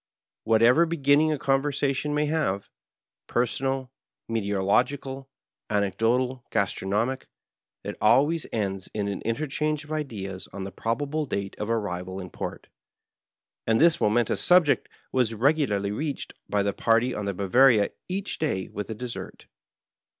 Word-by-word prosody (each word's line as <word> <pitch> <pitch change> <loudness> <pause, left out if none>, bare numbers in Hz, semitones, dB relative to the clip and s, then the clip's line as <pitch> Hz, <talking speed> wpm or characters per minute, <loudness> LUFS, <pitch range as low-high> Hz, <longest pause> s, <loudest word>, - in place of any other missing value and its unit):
Wliat 110 0 +4
eyer 150 +9 +6
beginning 155 -1 +3
a 155 - 0
conversation 140 +1 0
may 150 0 +2
have 145 -11 -1 0.3
— - - -66
^personal, 130 +2 -1 0.4
me 115 -1 -1
teorological, 125 +7 0 0.4
anecdotal, 115 +6 +1
gastronomic 105 +7 -1 0.3
— - - -38
^it - - -3
always 140 +9 +3
ends 95 -4 -2
in 105 -1 -1
an 100 -1 -3
interchange 150 +5 -1
of 150 - -13
ideas 105 -11 -4
on 100 0 -6
the 95 - -6
probable 145 +9 -2
date 100 -3 -3
of 105 - -3
arrival 95 -4 -2
in 90 -2 -8
port, - - -6 1.0
and 110 0 +3
this 165 +1 +4
momentous 110 +2 +2
subject 180 -5 +4 0.2
was 125 -3 +1
regularly 115 -6 +1
reached 145 +7 -4 0.2
by 100 -1 +1
the 100 0 0
party 115 +2 +2
on 105 - -4
the 100 -1 -2
Bwoa/ria 105 +3 +4 0.2
each 195 +2 -3
day 95 - -1
with 105 0 -5
the 110 - -5
dessert. 120 +2 -7
120 Hz, 145 wpm, -26 LUFS, 100-145 Hz, 1.0 s, eyer